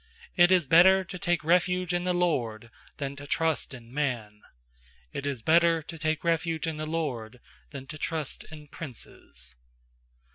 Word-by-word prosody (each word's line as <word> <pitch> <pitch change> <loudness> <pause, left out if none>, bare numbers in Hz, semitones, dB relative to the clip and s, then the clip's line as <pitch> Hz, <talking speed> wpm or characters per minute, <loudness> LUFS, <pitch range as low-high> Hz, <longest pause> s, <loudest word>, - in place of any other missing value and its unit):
8It 175 -1 +6
is 185 -4 +4
better 185 +6 +6
to 180 0 -8
take 175 -1 0
refuge 180 +2 +2
in 175 0 -1
the 180 - +1
LORD 120 -10 -1 0.3
Than 140 -1 -4
to 145 0 -9
trust 160 +1 0
in 120 -2 -12
man. 120 -8 -2 0.7
9It 140 - -4
is 130 -5 -3
better 165 +1 +4
to 165 - -8
take 155 -1 -1
refuge 165 -1 0
in 160 -2 -3
the 155 0 -4
LORD 130 -8 -3 0.3
Than 135 - -8
to 155 +2 -9
trust 155 -4 -3
in 150 -1 -12
princes. 70 - -8
155 Hz, 160 wpm, -28 LUFS, 130-170 Hz, 0.7 s, 8It